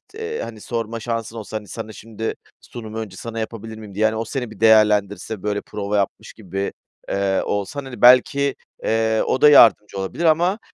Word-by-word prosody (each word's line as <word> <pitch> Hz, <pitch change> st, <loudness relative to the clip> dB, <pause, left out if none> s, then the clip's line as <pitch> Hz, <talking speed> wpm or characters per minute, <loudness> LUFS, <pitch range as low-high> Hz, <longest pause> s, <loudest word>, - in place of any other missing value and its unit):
eee, 450 Hz, +1 st, -4 dB
hani, 110 Hz, -2 st, -8 dB
sorma 115 Hz, -1 st, -4 dB
şansın 115 Hz, 0 st, -4 dB
olsa, 110 Hz, 0 st, -5 dB
hani, 105 Hz, -1 st, -10 dB
sana 110 Hz, 0 st, -7 dB
şimdi, 110 Hz, +1 st, -5 dB, 0.3 s
“Sunumu 110 Hz, -2 st, -9 dB
önce 100 Hz, -4 st, -7 dB
sana 115 Hz, +2 st, -6 dB
yapabilir 110 Hz, 0 st, -6 dB
miyim?” 105 Hz, -3 st, -11 dB
diye, 110 Hz, +2 st, +2 dB
yani, 110 Hz, 0 st, +2 dB
o 115 Hz, +1 st, -2 dB
seni 125 Hz, -1 st, -4 dB
bir 110 Hz, -, -13 dB
değerlendirse, 105 Hz, -2 st, +3 dB
böyle, 105 Hz, -1 st, -1 dB
prova 105 Hz, 0 st, -3 dB
yapmış 100 Hz, -1 st, -2 dB
gibi, 95 Hz, -2 st, -4 dB, 0.4 s
eee, 100 Hz, -1 st, 0 dB
olsan, 105 Hz, +8 st, -3 dB
hani, 130 Hz, -2 st, -9 dB
belki, 135 Hz, +3 st, +5 dB, 0.3 s
eee, 110 Hz, 0 st, +1 dB
o 130 Hz, -, 0 dB
da 150 Hz, -, +8 dB
yardımcı 110 Hz, -7 st, +6 dB
olabilir 95 Hz, -, -3 dB
ama, 175 Hz, +6 st, +3 dB
110 Hz, 185 wpm, -21 LUFS, 105-120 Hz, 0.4 s, da